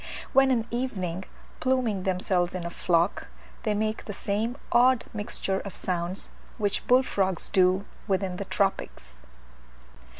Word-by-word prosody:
When 270 0 +6
in 240 -4 +3
the - - -19
evening 190 -8 -2 0.3
pluming 255 -6 +1
themselves 180 -1 +1
in 180 -2 -4
a 170 - -3
flock, 170 +1 +1 0.3
they 215 -2 0
make 215 +1 -1
the 205 - -5
same 215 +6 -1
odd 250 0 +5
mixture 205 -3 -2
of 200 - -7
sounds 180 +1 -3 0.3
which 205 -1 -1
bull 255 +1 +6
frogs 190 -7 -1
do 185 +1 +3 0.2
within 190 -2 0
the 200 - -4
tropics. 190 - -1
200 Hz, 140 wpm, -27 LUFS, 185-230 Hz, 0.3 s, When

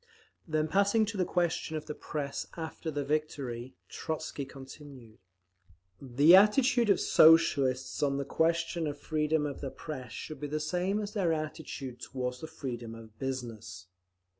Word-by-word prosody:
Then 155 -1 0
passing 200 +5 +3
to 210 +1 -5
the 185 - +2
question 170 -3 -1
of 155 - -6
the - - -5
Press 145 -2 -4
after 160 0 -5
the 145 -2 -2
victory, 135 -5 -3
Trotzky 155 -3 -4
continued: 135 -4 -12 0.8
"The 140 +6 +6
attitude 235 +4 +5
of 200 - +4
Socialists 135 -5 +4
on 140 -2 +1
the 140 - -2
question 165 +2 0
of 145 -1 -4
freedom 150 0 0
of 145 -2 -5
the 135 - -3
Press 130 -5 -7
should 155 - -7
be 150 - -4
the 150 +1 -2
same 180 +6 0
as 205 0 -5
their 190 -6 +1
attitude 155 -5 -5
toward 125 0 -3
the 160 - -5
freedom 120 -7 -6
of 110 -1 -14
business…. 115 -9 -5
150 Hz, 155 wpm, -30 LUFS, 130-165 Hz, 0.8 s, The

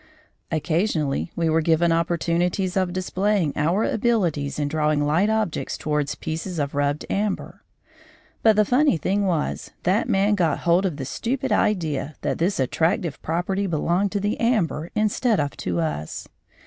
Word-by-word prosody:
Occasionally 160 -1 0
we 170 -1 0
were 160 +1 +3
given 165 +1 +3
opportunities 170 +2 0
of 185 -2 +1
displaying 185 -2 0
our 170 +8 +1
abilities 180 -12 0
in 145 -1 0
drawing 150 -1 +1
light 170 +8 +2
objects 220 -6 -1
towards 150 -2 -1
pieces 165 +3 -5
of 145 -2 -2
rubbed 145 +1 0
amber. 205 0 -2 0.8
But 220 -1 +5
the 210 0 +4
funny 260 - +3
thing 200 +6 0
was 165 -5 -1
that 205 +6 +1
man 200 0 +3
got 170 -7 +1
hold 175 +3 +3
of 160 -6 -5
the 135 - -4
stupid 255 - -2
idea 160 -9 0
that - - -2
this 180 +2 0
attractive 160 +3 0
property 185 +5 -1
belonged 175 +4 0
to 205 - 0
the 205 +2 -1
amber 180 -9 0
instead 215 +2 +1
of 145 -1 -1
to 85 -1 -2
us. 75 -2 -3
175 Hz, 155 wpm, -23 LUFS, 155-200 Hz, 0.8 s, But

